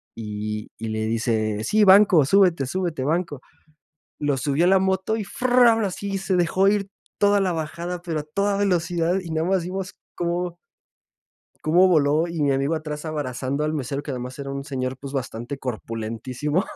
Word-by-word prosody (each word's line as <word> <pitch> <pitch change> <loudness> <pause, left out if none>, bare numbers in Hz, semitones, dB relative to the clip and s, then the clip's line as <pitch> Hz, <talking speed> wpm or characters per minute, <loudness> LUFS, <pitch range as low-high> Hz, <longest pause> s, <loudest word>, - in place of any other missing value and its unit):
Y 105 -1 -5
y 115 -1 -5
le 110 0 -2
dice: 110 -2 0
"Sí, 215 - +3
banco, 190 -4 +7
súbete, 175 -3 +4
súbete, 170 -3 -2
banco." 160 -1 -1 0.8
Lo 145 -2 0
subió 145 +5 +1
a - - +4
la 190 +1 +5
moto 190 +3 0
y 220 - -3
fram, 245 0 +3
y - - +1
así, 195 +1 -3
se 190 0 -1
dejó 180 +2 +2
ir 200 -1 +1 0.3
toda 205 0 +4
la 190 -2 +1
bajada, 170 +2 -4
pero 165 -3 -3
a - - -12
toda 200 +6 -1
velocidad, 175 -3 +1
y 175 - -9
nada 160 +1 0
más 190 -2 +1
vimos 190 +2 -5 0.2
cómo 175 0 -2 1.1
cómo 175 +4 +5
voló, 155 0 +3
y 170 -1 -4
mi 140 -1 +3
amigo 135 +4 0
atrás, 150 -1 -6
abrazando 140 -2 -3
al 155 - -1
mesero, 140 -1 -3
que 145 - -5
además 125 +1 -6
era 140 -1 -5
un 140 0 -5
señor, 130 -3 -3
pues, 135 +1 -9
bastante 130 0 -4
corpulentísimo. 125 - -3
155 Hz, 180 wpm, -23 LUFS, 135-185 Hz, 1.1 s, banco